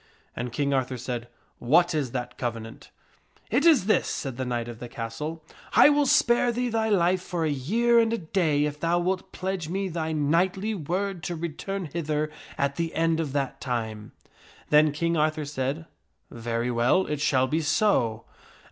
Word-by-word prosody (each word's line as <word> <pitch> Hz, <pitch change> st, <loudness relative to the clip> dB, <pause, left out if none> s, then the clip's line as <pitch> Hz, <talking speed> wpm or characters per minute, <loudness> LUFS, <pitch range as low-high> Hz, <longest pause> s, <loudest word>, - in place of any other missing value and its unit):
And 120 Hz, 0 st, -4 dB
King 140 Hz, +3 st, 0 dB
Arthur 130 Hz, -1 st, 0 dB
said, 120 Hz, -1 st, -4 dB, 0.2 s
" -, -, -41 dB
What 175 Hz, +1 st, +5 dB
is 145 Hz, -5 st, -1 dB
that 125 Hz, 0 st, -5 dB
covenant? 115 Hz, -2 st, -5 dB, 0.2 s
" -, -, -36 dB
" -, -, -32 dB
It 275 Hz, +9 st, +3 dB
is 300 Hz, -, +5 dB
this," 215 Hz, -, +2 dB
said 135 Hz, -4 st, -4 dB
the 130 Hz, +1 st, -3 dB
knight 120 Hz, -1 st, -2 dB
of 120 Hz, -1 st, -8 dB
the 120 Hz, -, -7 dB
castle, 120 Hz, +8 st, -5 dB, 0.2 s
" -, -, -21 dB
I -, -, +8 dB
will 290 Hz, -1 st, +3 dB
spare 245 Hz, -4 st, +4 dB
thee 245 Hz, +1 st, -1 dB
thy 220 Hz, -1 st, 0 dB
life 185 Hz, -2 st, +3 dB
for 175 Hz, -3 st, -2 dB
a 155 Hz, -, +1 dB
year 230 Hz, -, +2 dB
and 225 Hz, -1 st, +3 dB
a 230 Hz, -, 0 dB
day 160 Hz, -5 st, +1 dB
if 150 Hz, 0 st, -4 dB
thou 170 Hz, +2 st, +1 dB
wilt 185 Hz, +2 st, -1 dB
pledge 185 Hz, -3 st, -3 dB
me 195 Hz, +2 st, -2 dB
thy 160 Hz, -2 st, -3 dB
knightly 175 Hz, +8 st, +1 dB
word 185 Hz, +1 st, -2 dB
to 175 Hz, -, -3 dB
return 170 Hz, +4 st, -4 dB
hither 155 Hz, -1 st, -2 dB, 0.3 s
at 140 Hz, 0 st, 0 dB
the 165 Hz, -1 st, -2 dB
end 165 Hz, 0 st, +2 dB
of 155 Hz, -4 st, -2 dB
that 140 Hz, -2 st, -2 dB
time." 110 Hz, -5 st, -4 dB, 0.6 s
Then 150 Hz, 0 st, +6 dB
King 170 Hz, +3 st, 0 dB
Arthur 155 Hz, 0 st, +1 dB
said, 145 Hz, +2 st, -3 dB, 0.2 s
' -, -, -48 dB
Very 115 Hz, +1 st, -2 dB
well; 120 Hz, +10 st, +3 dB
it 150 Hz, -1 st, -3 dB
shall 130 Hz, -3 st, +3 dB
be 155 Hz, +5 st, 0 dB
so." 150 Hz, -, +1 dB
155 Hz, 195 wpm, -26 LUFS, 130-185 Hz, 0.6 s, I